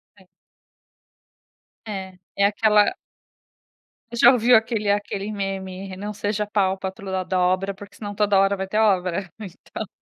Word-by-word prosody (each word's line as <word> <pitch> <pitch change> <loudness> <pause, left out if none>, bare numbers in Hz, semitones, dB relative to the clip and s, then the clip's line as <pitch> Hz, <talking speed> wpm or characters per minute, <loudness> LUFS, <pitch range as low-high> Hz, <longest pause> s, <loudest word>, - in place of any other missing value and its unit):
É. 190 -2 -22 1.6
É, 190 -2 -6 0.2
é 200 - +3
aquela 210 0 +3 1.2
Você 235 0 +2
já 245 - +10
ouviu 245 0 +5
aquele 220 -2 +1
aquele 205 0 -1
meme: 195 -1 -5
"Não 205 +2 -5
seja 210 0 -2
pau 195 -2 +1
pra 190 0 -3
toda 190 -1 -5
obra, 185 +2 +1
porque 200 +1 -13
se - - -26
não, 205 -1 -5
toda 205 -1 +3
hora 195 +1 +3
vai 190 0 -3
ter 210 +3 0
obra", 190 -3 +1
então 205 +1 -8
200 Hz, 150 wpm, -23 LUFS, 190-210 Hz, 1.6 s, já